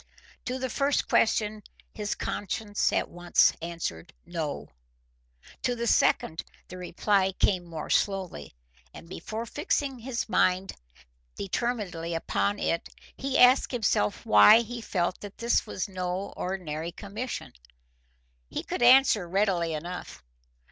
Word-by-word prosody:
To 255 +1 -2
the 260 0 -2
first 280 +3 +1
question 215 -1 +2 0.3
his 210 -1 -3
conscience 205 +1 -2
at - - 0
once 175 0 +3
answered 170 0 -5
no; 165 -4 -4 0.9
to 245 - 0
the 235 0 -3
second 160 -7 +2 0.3
the 185 - -8
reply 190 +2 +1
came 185 -1 +1
more 165 -3 -6
slowly, 185 - -1 0.4
and - - -11
before 215 +5 -6
fixing 280 - -2
his 235 0 -3
mind 185 -3 +2 0.6
determinedly 190 -6 -3
upon 100 -10 0
it 165 - -1 0.3
he 270 0 -1
asked 250 +2 +6
himself 205 - 0
why 105 - +8
he 235 +1 -6
felt 180 -4 -1
that 205 -1 -9
this 235 -1 +1
was 190 - -3
no 185 0 -4
ordinary 170 -3 -4
commission. 210 +7 -6 1.0
He - - -4
could - - -4
answer 240 -7 +6
readily 180 -4 +1
enough. 175 +4 -7
195 Hz, 125 wpm, -27 LUFS, 170-230 Hz, 1.0 s, why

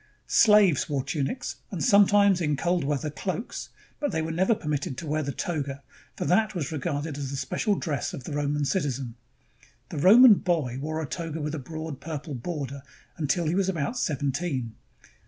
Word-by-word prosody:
Slaves 210 - +5
wore 140 -3 -1
tunics 145 - -3
and 190 -7 -4
sometimes, 200 -3 +5
in 150 -3 +1
cold 175 +1 +1
weather, 145 +1 -1
cloaks; 190 - -4 0.3
but 290 -4 -1
they 160 -3 -1
were 160 - -3
never 190 +7 +2
permitted 150 - -3
to 165 - -6
wear 155 +1 0
the 140 -1 -3
toga, 140 -4 -3 0.3
for - - -2
that 215 +3 +2
was 155 -5 -3
regarded 145 0 -3
as 140 -2 -4
the 140 - -4
special 200 +10 0
dress 155 -6 -2
of 135 - -7
the 155 - -7
Roman 145 0 0
citizen. 135 -6 -1 0.8
The - - -4
Roman 215 - +8
boy 150 -8 -1
wore 155 +2 -3
a - - -2
toga 165 +2 -5
with 150 0 -3
a 155 - -3
broad 155 0 -6
purple 155 -1 -5
border 140 0 -5 0.3
until 165 +3 0
he 155 - 0
was 190 0 +1
about 170 - -2
seventeen. 140 - -2
155 Hz, 180 wpm, -26 LUFS, 140-180 Hz, 0.8 s, Roman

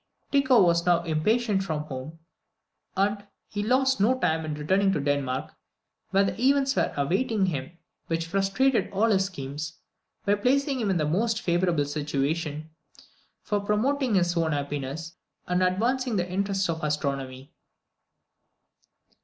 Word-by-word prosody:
Tycho 265 -6 +5
was 170 -1 +3
now 175 -1 +3
impatient 195 +6 +1
for 160 -5 -2
home, 150 +2 -7 0.8
and 200 +1 0 0.2
he 205 - -4
lost 260 +2 +2
no 250 +6 +3
time 160 -10 0
in 155 -1 -3
returning 190 +6 +2
to 175 - 0
Denmark, 140 -2 -1 0.6
where 195 -1 +2
events 275 +1 +3
were - - +1
awaiting 195 - +1
him 165 -1 -4 0.3
which 165 0 -1
frustrated 195 +9 +1
all 215 +3 +2
his 190 -2 +3
schemes, 150 -2 -6 0.5
by 200 - +3
placing 265 +6 +1
him 215 -4 0
in 190 - +2
the 155 - +1
most 215 +8 +1
favourable 175 -4 +1
situation 150 +2 -2 0.7
for 205 - 0
promoting 235 +4 +1
his 175 -1 +2
own 165 -2 +1
happiness, 145 +3 -4 0.3
and 180 +1 +1
advancing 235 +7 +1
the 180 -2 0
interests 195 +1 -1
of 160 -1 -3
astronomy. 140 -3 -3
185 Hz, 135 wpm, -26 LUFS, 155-210 Hz, 0.8 s, Tycho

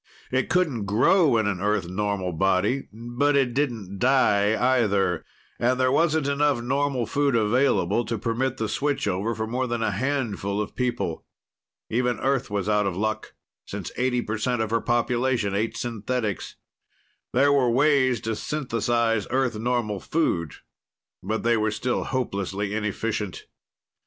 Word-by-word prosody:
It 130 0 0
couldn't 150 - +1
grow 120 - +4
in 110 - +1
an 100 -3 -1
Earth 105 -3 0
normal 95 -1 -2
body, 95 +9 +1
but 120 +6 0
it 135 -3 +2
didn't 115 -9 -2
die, 110 -5 +3 0.2
either. 100 -6 +1 0.4
And 125 +2 +1
there 130 0 +3
wasn't 160 0 +2
enough 140 -2 +2
normal 135 0 0
food 140 +1 +1
available 115 -2 +2
to 115 +1 -2
permit 120 +4 -1
the 110 - -1
switch 145 +2 -1
over 100 +5 -1
for 110 +1 -2
more 125 +3 -2
than 120 -1 -2
a 110 - +1
handful 105 -4 -2
of 105 - -4
people. 120 -10 -2 0.6
Even 125 +1 0
Earth 135 -3 0
was 100 -1 -2
out 105 -1 +2
of 90 -2 -3
luck, 110 +1 -2 0.3
since - - -6
eighty 125 0 0
percent 110 +3 -1
of 110 -1 -1
her 115 0 +1
population 120 -2 0
ate 110 +3 -1
synthetics. 115 -3 -3 0.8
There 140 +3 +4
were 130 -3 +3
ways 130 -1 +3
to 110 -1 -2
synthesize 115 -5 0
Earth 130 -2 +1
normal 115 -3 -1
food, 85 - -1 0.7
but 110 +4 -2
they 115 0 +3
were 110 0 +1
still 110 +4 -2
hopelessly 100 -5 -2
inefficient. 105 -1 -3
115 Hz, 150 wpm, -25 LUFS, 105-130 Hz, 0.8 s, grow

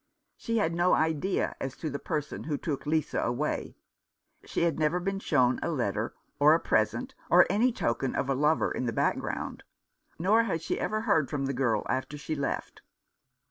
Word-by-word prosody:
She 230 0 -2
had 170 -6 +1
no 175 +2 +3
idea 160 +4 0
as 135 - -4
to 160 - -4
the 140 -1 -3
person 150 -2 -4
who 150 -2 -1
took 145 -1 -4
Lisa 155 -1 0
away 125 +6 -2 0.3
— - - -47
she - - -1
had 165 -3 +1
never 155 +3 +2
been 195 +2 -2
shown 130 -9 +2
a - - -1
letter 115 -7 -1 0.2
or 150 +2 +7
a - - +1
present, - - 0 0.2
or - - +7
any 240 +5 +3
token 130 - -1
of - - 0
a 135 - +2
lover 150 +4 +2
in 125 - -2
the 115 - -1
background - - -1 0.3
— - - -52
nor 215 +7 +3
had 165 -7 -1
she - - -2
ever 215 0 -1
heard 180 - +2
from 140 -2 -2
the 135 - -1
girl 120 -5 +1
after 130 +3 -2
she 145 +2 -4
left. 140 -2 -3
150 Hz, 195 wpm, -29 LUFS, 135-170 Hz, 0.3 s, or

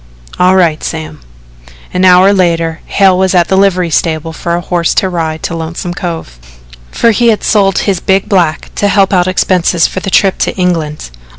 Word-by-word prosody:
"All 185 +1 +4
right, 170 -5 +1
Sam." 160 -1 -6 0.7
An 180 +1 +1
hour 185 +2 +5
later 165 -3 0
Hale 195 -2 +3
was 190 0 0
at 175 -1 +2
the 190 - +2
livery 185 -3 +1
stable 160 0 -1
for 170 +2 -3
a 175 - -3
horse 175 -1 -1
to 190 - +1
ride 160 -3 -4
to 170 - -3
Lonesome 170 +2 -5
Cove, 165 - -6 0.5
for 230 - +1
he 235 +2 +1
had 220 -2 +1
sold 195 -3 +2
his 195 -4 0
big 190 +3 0
black 175 -7 -1
to 205 - +1
help 200 -1 +2
out 180 -1 +2
expenses 180 -2 +1
for - - -3
the 195 - -5
trip 195 0 +2
to - - -1
England. 165 - -2
180 Hz, 190 wpm, -11 LUFS, 165-190 Hz, 0.7 s, hour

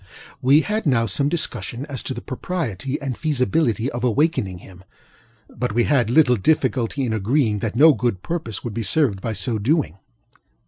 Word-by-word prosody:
We 140 +4 +5
had 210 0 -2
now 120 -4 +3
some 140 +7 0
discussion 130 - -3
as 140 -5 -5
to 130 - -4
the - - -7
propriety 135 - -4
and 135 -3 -4
feasibility 130 -5 0
of 120 +1 -5
awakening 125 - +1
him; 90 +1 -15 0.6
but 125 -3 -4
we 120 - +3
had 125 -5 +2
little 125 -2 +4
difficulty 130 +1 0
in 115 - -1
agreeing 110 +1 +1
that 110 +1 -3
no 155 +5 +7
good 120 -8 -2
purpose 155 - -4
would 120 - -5
be 115 - -3
served 110 -5 +1
by 115 - -3
so 110 +3 -1
doing. 125 - 0
125 Hz, 175 wpm, -22 LUFS, 110-145 Hz, 0.6 s, no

